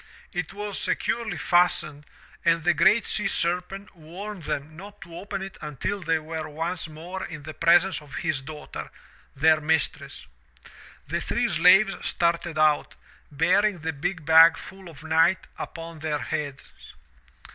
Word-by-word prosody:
It 180 -1 -3
was 205 0 -4
securely 225 -6 -1
fastened 165 -3 +1 0.4
and 165 -1 +2
the 175 +1 +3
GREAT 200 +7 +4
SEA 210 - +1
SERPENT 180 +4 -1
warned 180 +3 -9
them 150 +3 -4
not 200 +4 -12
to 170 - -11
open 195 +1 -5
it 195 0 -9
until 150 +7 -4
they 165 -1 +1
were 155 0 -6
once 165 +4 -3
more 170 +5 -7
in 155 -3 -8
the 155 +1 -8
presence 175 +2 +3
of 145 -2 -12
his 160 -6 -1
daughter, 150 +2 -8 0.5
their 155 +2 +4
mistress. 155 -3 -1 0.8
The - - -2
three - - 0
slaves 195 +2 +5
started 170 -1 -1
out, 155 -1 +2 0.4
bearing 180 +7 +2
the 160 0 -3
big 165 +2 -4
bag 165 +1 +7
full 190 -2 -11
of 160 -1 -14
night 160 +3 +2
upon 165 -1 -7
their 155 -1 -2
heads. 145 -2 -5
165 Hz, 145 wpm, -25 LUFS, 155-185 Hz, 0.8 s, bag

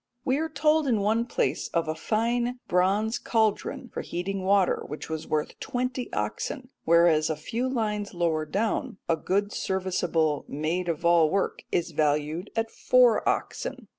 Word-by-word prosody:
We 265 +2 +2
are 320 0 -1
told 310 -1 +2
in 225 -5 +2
one 225 +3 +1
place - - -1
of 165 -1 +1
a 155 - 0
fine 235 +8 0
bronze 195 +5 +2
cauldron 220 -3 0
for - - -3
heating 190 +3 -3
water 195 -1 +3
which 150 +2 -7
was 160 -1 -4
worth 150 -1 -2
twenty 250 0 -3
oxen, 260 -3 -3 0.2
whereas 165 -2 +4
a 160 - 0
few 230 - -3
lines 210 -5 -2
lower 165 -3 0
down 205 +2 -1
a 165 - +3
good 200 +6 -1
serviceable 175 -6 0
maid 165 +5 -2
of 170 +1 -2
all 170 -2 +5
work 195 +4 -1
is 170 -1 0
valued 150 +4 0
at 225 0 -1
four - - +4
oxen. - - -3
190 Hz, 160 wpm, -27 LUFS, 165-230 Hz, 0.2 s, all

